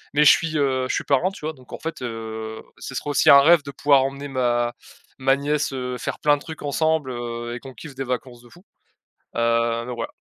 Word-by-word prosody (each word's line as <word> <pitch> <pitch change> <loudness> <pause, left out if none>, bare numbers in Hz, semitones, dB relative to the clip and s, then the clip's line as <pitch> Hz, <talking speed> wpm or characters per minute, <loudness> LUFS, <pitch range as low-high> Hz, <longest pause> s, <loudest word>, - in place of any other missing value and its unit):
Mais 150 - +5
je - - +10
suis, 160 -1 +1
heu, 130 -3 +1
je - - 0
suis - - -1
parrain, 140 +6 +2
tu 195 -6 -9
vois, 160 - -2
donc 130 -4 -19
en - - -4
fait, 165 -3 -5
heu, 110 -2 -6 0.2
ce - - -7
serait 145 - -3
aussi 145 - +4
un 140 0 +10
rêve 160 +1 +5
de 140 - -8
pouvoir 140 0 +4
emmener 140 +1 -4
ma 120 -3 0 0.5
ma 135 0 +3
nièce, 145 +1 -1
heu, 125 -1 -3
faire - - -4
plein 150 -1 +4
de - - -13
trucs 160 -2 -9
ensemble, 155 -1 0
heu 120 -1 -5
et - - -6
qu'on 135 0 -11
kiffe 150 +5 -10
des 135 - -3
vacances 125 -1 -4
de 120 - -18
fou. 175 - -19 0.7
Heu, 115 0 +1
donc 125 -1 -5
voilà. 115 - -5
135 Hz, 240 wpm, -23 LUFS, 120-145 Hz, 0.7 s, je